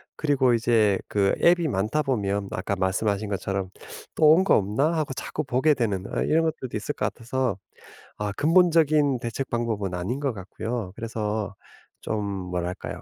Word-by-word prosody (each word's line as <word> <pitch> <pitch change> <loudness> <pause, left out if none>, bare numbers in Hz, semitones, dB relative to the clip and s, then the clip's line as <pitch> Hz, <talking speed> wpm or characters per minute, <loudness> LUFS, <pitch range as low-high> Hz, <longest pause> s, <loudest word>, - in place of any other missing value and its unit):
그리고 135 -5 +2
이제 110 -4 +3
그 100 -1 +2
앱이 170 -1 +5
많다 110 +6 0
보면 100 -7 -1
뭐 - - -5
아까 100 +2 -2
말씀하신 100 +2 0
것처럼 95 -1 -2 0.5
'또 155 -1 +6
온 180 +4 +6
거 - - +4
없나?' 110 - +1
하고 145 -4 -1
자꾸 155 - -4
보게 130 +4 +2
되는 100 -6 -1
어 - - 0
이런 165 +1 +2
것들도 150 -7 -3
있을 110 +7 -3
것 - - -1
같아서 125 -3 -2 0.6
아 105 -1 -2
근본적인 155 -5 +4
대책 120 +3 -4
방법은 110 -5 -2
아닌 95 +10 -3
것 140 -4 -1
같고요. 105 +1 -5
그래서 105 -3 -3 0.5
좀 110 -1 -2
뭐랄까요? 90 -2 -4
115 Hz, 325 characters per minute, -25 LUFS, 100-140 Hz, 0.6 s, 또